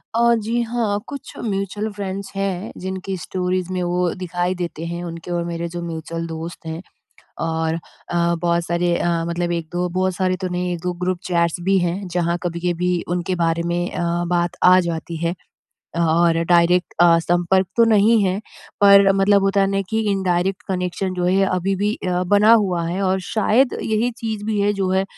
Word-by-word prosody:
अ, 235 0 +4
जी। 230 +2 -1
हाँ, 225 -3 -1
कुछ 280 -2 -8
mutual 205 +1 -2
friends 200 -1 -5
हैं 195 +1 -2
जिनकी 190 +1 -4
स्टोरीज़ 180 +2 -2
में 180 - -1
वो 175 0 0
दिखाई 180 0 -2
देते 170 -2 -5
हैं 170 +1 -4
उनके 170 0 -7
और 170 -1 0
मेरे 170 0 -3
जो 175 - -3
म्यूचुअल 165 0 -5
दोस्त 165 +1 -7
हैं। 160 +2 -5 0.7
और 160 0 -1 0.3
अ, 170 0 +1
बहुत 170 0 +1
सारे 170 0 +1
अ, 175 - 0 0.2
मतलब 175 0 -1
1-2 175 +1 -2
बहुत 185 +1 0
सारे 185 0 +1
तो - - 0
नहीं 180 0 -2
1-2 180 +1 -3
ग्रुप 180 -1 0
चैट्स 170 0 +1
भी 195 0 +4
हैं 180 +2 -2
जहाँ 175 -1 0
कभी-कभी 175 +1 -1 0.2
उनके 180 +1 -2
बारे 165 0 +1
में 175 0 0
अ, - - -3 0.3
बात 175 0 0
आ 185 0 +7
जाती 170 -1 -3
है। 170 +2 0 0.6
अ, 170 - -2
और 165 0 +3
डायरेक्ट 175 +1 +3
अ, - - +8
संपर्क 175 +2 +1
तो 230 - +7
नहीं 220 +1 +5
है 190 0 0 0.4
पर 200 -1 +7
मतलब 195 +1 +4
होता 195 0 +2
है 195 - +3
ना 195 0 0
कि 220 0 0
इनडायरेक्ट 190 0 0
कनेक्शन 185 0 -2
जो 180 -1 -1
है 190 +2 +3
अभी 190 +1 0
भी 205 +3 0
अ, 180 0 0
बना 205 +4 +4
हुआ 190 -6 +2
है 180 +3 -2
और 190 0 +1
शायद 230 +4 +2
यही 220 +3 0
चीज़ 220 -4 -4
भी 215 -1 0
है 205 +1 +3
जो 195 -2 -1
है, 190 0 +2
180 Hz, 190 wpm, -21 LUFS, 170-195 Hz, 0.7 s, अ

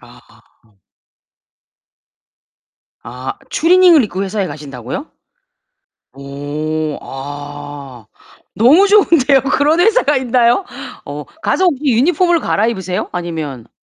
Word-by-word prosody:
아. 105 -3 -22 2.2
아 125 +3 -7 0.2
추리닝을 345 -2 +5
입고 195 -1 -4
회사에 195 0 -2
가신다고요? 145 - -7 1.1
오. 145 +3 -4
아 145 -2 -9 0.5
너무 300 - +5
좋은데요. 310 - +4
그런 290 +4 +1
회사가 395 - +3
있나요? 245 +6 +2 0.4
어 - - -6 0.2
가서 375 - +1
혹시 295 -4 0
유니폼으로 335 - +2
갈아입으세요? 195 - -2
아니면 155 -9 -5
190 Hz, 220 characters per minute, -16 LUFS, -, 2.2 s, 추리닝을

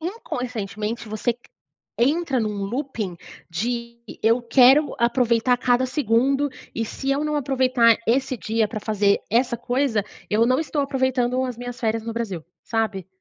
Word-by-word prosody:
inconscientemente 235 - -4
você 215 +3 -1
c 235 - -23 0.6
entra 280 +2 +2
num 215 -2 -1
looping 220 -4 -3 0.3
de: 235 +6 -3 0.2
"Eu 230 +3 +3
quero 265 +4 +5
aproveitar 235 0 +2
cada 245 +1 +2
segundo 270 +2 +1 0.2
e 230 - -1
se 270 +5 -4
eu 280 +2 +1
não 300 0 -1
aproveitar 255 -4 +3
esse 255 +2 +1
dia 220 -1 0
pra 215 - -4
fazer 205 -2 +1
essa 235 +2 +2
coisa, 245 -3 0 0.2
eu 220 +2 +3
não 255 +3 +2
estou 300 -2 -1
aproveitando 260 -2 0
as 250 -2 -3
minhas 245 +1 -7
férias 225 -1 0
no 230 +1 -5
Brasil", 205 -8 -4 0.2
sabe. 215 -5 -2
240 Hz, 150 wpm, -23 LUFS, 225-260 Hz, 0.6 s, quero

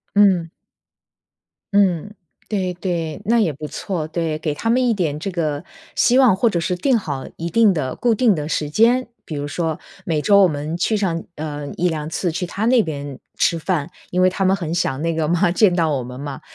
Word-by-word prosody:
嗯。 190 -5 +4 1.3
嗯， 195 -1 +2 0.4
对 190 -4 -1
对， 170 -4 -3
那 235 +2 +3
也 195 -8 +2
不 150 +2 -8
错。 160 +1 -4
对， 160 -1 -2
给 155 -1 -2
他 225 +10 -3
们 250 +2 +3
一 235 - +3
点 165 -8 -1
这 195 +5 -4
个 155 -4 -2 0.3
希 250 +2 +4
望 250 -8 +6
或 235 +5 +2
者 175 -6 +1
是 180 +2 -1
定 235 +6 +2
好 140 -7 -5
一 170 +1 -4
定 215 +1 +4
的 135 -6 -2
固 240 -2 +2
定 220 -3 +3
的 150 -1 -3
时 150 -2 -1
间。 235 +9 +3 0.2
比 - - -7
如 145 0 -3
说， 160 0 -2 0.3
每 155 -3 0
周 200 +3 +5
我 185 - +6
们 150 +1 -3
去 215 +5 +1
上 170 -5 -1
呃， 150 -1 -5
1-2 160 -4 -1
次 175 0 -1
去 180 +3 -3
他 200 +5 -3
那 245 -2 +5
边 145 -4 -6 0.2
吃 170 - +3
饭， 165 -2 -1 0.2
因 180 +1 +1
为 185 - +5
他 190 +1 -1
们 190 +1 +4
很 170 -4 -3
想 135 -5 -1
那 165 0 0
个 160 -1 0
嘛 175 +1 +2
见 185 0 +4
到 165 -3 +2
我 130 - -2
们 125 +1 -8
嘛。 140 -1 -6
170 Hz, 225 characters per minute, -20 LUFS, 155-200 Hz, 1.3 s, 望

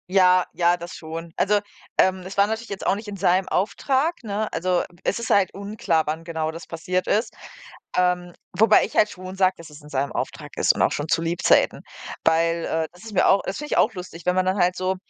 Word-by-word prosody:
Ja, 185 -1 +5
ja, 175 0 +3
das 170 0 -8
schon. 165 +1 -7
Also, 205 +1 +3 0.4
ähm, 190 0 +3
es 185 +2 -9
war 200 0 +5
natürlich 220 +1 -4
jetzt 200 - -6
auch - - +3
nicht 210 +2 -8
in 205 - -5
seinem 185 0 +2
Auftrag, 270 - 0
ne? 215 0 -3
Also, 180 0 0 0.2
es - - 0
ist 235 - -4
halt 195 -2 +3
unklar, 200 -5 -1
wann 160 +2 -3
genau 160 -2 -3
das 165 +1 -9
passiert 180 +3 -2
ist, 220 +2 +1 0.6
ähm, 180 -1 +1 0.2
wobei 215 +1 +6
ich - - -11
halt 210 - +5
schon 185 0 -9
sage, 185 -1 +3
dass 165 -1 -12
es 150 +1 -13
in 150 - -14
seinem 140 0 -1
Auftrag - - -5
ist - - +4
und - - -2
auch - - +3
schon 145 - -3
zu 165 - +1
Lebzeiten. 170 +1 +2 0.4
Weil, 165 +1 +2
äh, 160 0 -1
das 180 - -16
ist 220 - -8
mir - - +3
auch 195 - +5
das 195 - -3
finde 295 0 -4
ich - - +1
auch 225 - +3
lustig, 180 -3 -9
wenn 180 0 +2
man 185 0 +2
dann 185 +2 +1
halt 180 -1 +2
so, 185 +1 -1
185 Hz, 235 wpm, -23 LUFS, 170-200 Hz, 0.6 s, wobei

